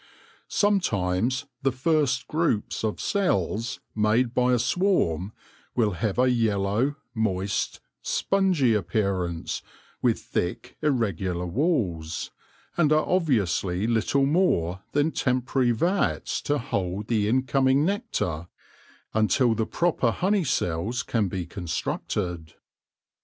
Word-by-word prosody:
Sometimes 130 Hz, -, +1 dB, 0.2 s
the 135 Hz, -1 st, +2 dB
first 140 Hz, 0 st, +1 dB
groups 155 Hz, -12 st, 0 dB
of 110 Hz, -1 st, -1 dB
cells 115 Hz, -, 0 dB, 0.2 s
made 110 Hz, +3 st, +2 dB
by 125 Hz, 0 st, +3 dB
a 125 Hz, -, +4 dB
swarm 115 Hz, -, +1 dB, 0.4 s
will 110 Hz, -4 st, +2 dB
have 95 Hz, +4 st, -2 dB
a 125 Hz, 0 st, +4 dB
yellow, 110 Hz, +3 st, +1 dB, 0.2 s
moist, 100 Hz, -3 st, -1 dB, 0.2 s
spon 195 Hz, -1 st, +1 dB
y 130 Hz, -3 st, +4 dB
appearance, 95 Hz, -4 st, -1 dB, 0.4 s
with -, -, +2 dB
thick, -, -, -3 dB
irregular 95 Hz, -, 0 dB
walls, 90 Hz, -, -1 dB, 0.5 s
and 155 Hz, -3 st, +3 dB
are 155 Hz, 0 st, +4 dB
obviously 105 Hz, -, +1 dB
little 120 Hz, +4 st, +2 dB
more 100 Hz, -, +1 dB
than 145 Hz, +2 st, +2 dB
temporary 130 Hz, -1 st, +1 dB
vats 170 Hz, -, 0 dB
to 145 Hz, -, 0 dB
hold 100 Hz, -6 st, -2 dB
the 105 Hz, -3 st, +1 dB
incoming 130 Hz, +3 st, +2 dB
nectar 175 Hz, -, -2 dB, 0.7 s
until 115 Hz, +3 st, +3 dB
the 110 Hz, 0 st, -1 dB
proper 170 Hz, -8 st, +1 dB
honey 190 Hz, -, +1 dB
cells 110 Hz, -, -1 dB
can 110 Hz, -4 st, 0 dB
be 90 Hz, -1 st, -3 dB
constructed. 85 Hz, -1 st, -3 dB
115 Hz, 110 wpm, -26 LUFS, 95-140 Hz, 0.7 s, a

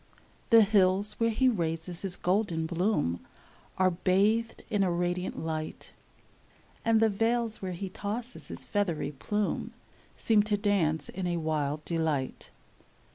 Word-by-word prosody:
The 230 Hz, -1 st, +8 dB
hills 200 Hz, 0 st, +3 dB
where 230 Hz, 0 st, +3 dB
he 260 Hz, +4 st, +2 dB
raises 170 Hz, -5 st, -2 dB
his 195 Hz, -2 st, -4 dB
golden 180 Hz, -3 st, 0 dB
bloom 170 Hz, -, 0 dB, 0.6 s
Are 185 Hz, 0 st, +3 dB
bathed 200 Hz, +6 st, +1 dB
in 205 Hz, -2 st, 0 dB
a 185 Hz, -2 st, +2 dB
radiant 175 Hz, +1 st, -2 dB
light, 155 Hz, -1 st, -5 dB, 0.9 s
And 225 Hz, -1 st, +3 dB
the 225 Hz, -, +5 dB
vales 225 Hz, +2 st, +1 dB
where 185 Hz, -1 st, -3 dB
he 190 Hz, +3 st, -5 dB
tosses 215 Hz, +6 st, -6 dB
his -, -, -8 dB
feathery 175 Hz, -8 st, -1 dB
plume 205 Hz, +9 st, -2 dB, 0.4 s
Seem 220 Hz, -2 st, +3 dB
to 210 Hz, 0 st, 0 dB
dance 170 Hz, -7 st, +1 dB
in 185 Hz, -1 st, -4 dB
a 175 Hz, -1 st, -1 dB
wild 155 Hz, -2 st, -2 dB
delight. 160 Hz, -6 st, -2 dB
185 Hz, 135 wpm, -29 LUFS, 165-210 Hz, 0.9 s, The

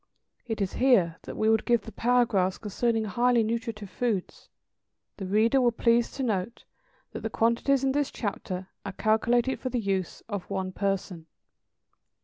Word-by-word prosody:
It 225 Hz, -2 st, -3 dB
is 195 Hz, -, -1 dB
here 195 Hz, -11 st, +4 dB
that -, -, -7 dB
we 215 Hz, -, +1 dB
would 220 Hz, 0 st, +3 dB
give 235 Hz, -2 st, +2 dB
the 225 Hz, -, -10 dB
paragraphs 230 Hz, -7 st, +2 dB
concerning 225 Hz, +2 st, -1 dB
highly 240 Hz, +3 st, +2 dB
nutritive 225 Hz, -3 st, -4 dB
foods. 225 Hz, -7 st, -3 dB, 0.7 s
The 195 Hz, -, -5 dB
reader 225 Hz, +7 st, +3 dB
will 240 Hz, -1 st, +4 dB
please 235 Hz, 0 st, +2 dB
to 270 Hz, -, -3 dB
note 220 Hz, -1 st, -2 dB, 0.5 s
that -, -, -6 dB
the 220 Hz, -, -3 dB
quantities 235 Hz, +5 st, +2 dB
in 270 Hz, -, +2 dB
this 290 Hz, 0 st, 0 dB
chapter 190 Hz, -3 st, -5 dB
are 195 Hz, -, -5 dB
calculated 235 Hz, +5 st, +1 dB
for 255 Hz, -, -3 dB
the 250 Hz, -1 st, -1 dB
use 195 Hz, -4 st, -2 dB
of 205 Hz, -4 st, -5 dB
one 190 Hz, -1 st, -2 dB
person. 190 Hz, -4 st, -3 dB
225 Hz, 160 wpm, -27 LUFS, 195-240 Hz, 0.7 s, here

